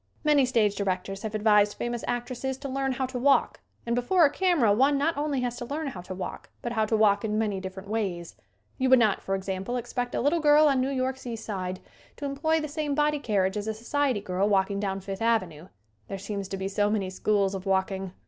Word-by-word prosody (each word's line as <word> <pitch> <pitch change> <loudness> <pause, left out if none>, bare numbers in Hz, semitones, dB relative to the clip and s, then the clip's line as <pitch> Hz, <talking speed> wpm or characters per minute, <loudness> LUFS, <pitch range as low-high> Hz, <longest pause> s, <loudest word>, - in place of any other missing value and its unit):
Many 295 -4 +4
stage 220 -5 +2
directors 195 0 -2
have 220 -1 -4
advised 210 -1 +3
famous 240 -1 -3
actresses 250 +2 -3
to 280 +1 -6
"learn 270 0 -1
how 260 +1 -1
to 255 -1 -5
walk" 275 +3 +3 0.3
and 235 - -1
before 320 +8 +4
a 285 - +3
camera 335 - +3
one 275 +6 +3
not 320 +4 +1
only 290 -2 -1
has 245 -1 -2
to 240 - -5
learn 300 +5 -4
how 190 -9 -8
to 185 +1 -7
walk 185 - -6
but 240 - -3
how 220 -2 +1
to 220 - +1
walk 205 -2 +3
in 215 -1 -1
many 210 -3 0
different 190 +1 -8
ways. 195 -6 -3 0.4
We 260 - +2
would 260 0 +7
not, 220 -4 +2
for 195 - -1
example, 190 +4 -3
expect 245 0 -3
a - - 0
little 295 +6 +2
girl 300 0 +6
on 270 -3 +3
New 260 - 0
York's 260 -1 -2
East 225 -2 -5
Side 185 -3 -4 0.4
to 285 - -5
employ 300 +4 0
the 305 - -3
same 295 -1 -2
body 300 0 +2
carriage 200 -5 0
as 205 +1 -4
a 220 - -2
society 255 0 0
girl 195 +1 0
walking 200 0 +1
down 195 -1 -2
Fifth 195 +1 -6
avenue. 185 -9 0 0.4
There 195 - -5
seem 200 +1 -4
to 195 0 -5
be 190 0 -3
so 205 +1 +1
many 200 -3 -1
schools 200 0 +1
of 195 0 -5
walking! 190 -1 -1
220 Hz, 230 wpm, -27 LUFS, 195-265 Hz, 0.4 s, would